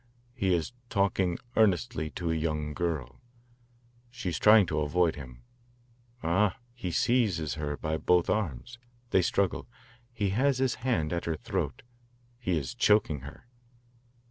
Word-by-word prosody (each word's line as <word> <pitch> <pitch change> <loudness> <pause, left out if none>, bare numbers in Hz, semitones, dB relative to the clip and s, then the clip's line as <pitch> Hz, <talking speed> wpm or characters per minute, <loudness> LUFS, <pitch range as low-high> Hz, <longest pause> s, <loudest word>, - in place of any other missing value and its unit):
"He 95 -8 +1
is 85 +8 -3 0.2
talking 95 -3 +1 0.2
earnestly 110 -4 +2
to 85 -2 -1
a - - 0
young 75 -1 -2
girl. 75 -8 -3 0.9
She 115 -6 -4
is 85 - -3
trying 105 -1 +7
to 75 -2 -1
avoid 80 +3 +2
him. 65 -4 -11 0.8
Ah 95 +4 +2 0.2
he 120 -7 -5
seizes 90 - +1
her 75 0 -3
by 80 +1 -2
both 90 +2 +3
arms. 105 - -2 0.3
They 95 - +5
struggle. 95 +1 0 0.4
He 105 -4 -1
has 130 +6 +2
his 130 -2 +1
hand 90 -11 0
at 85 - -2
her 80 - -1
throat. - - -3 0.6
He 90 -9 0
is 65 -5 -3
choking 105 -8 +3
her." 70 - -11
85 Hz, 145 wpm, -29 LUFS, 75-105 Hz, 0.9 s, trying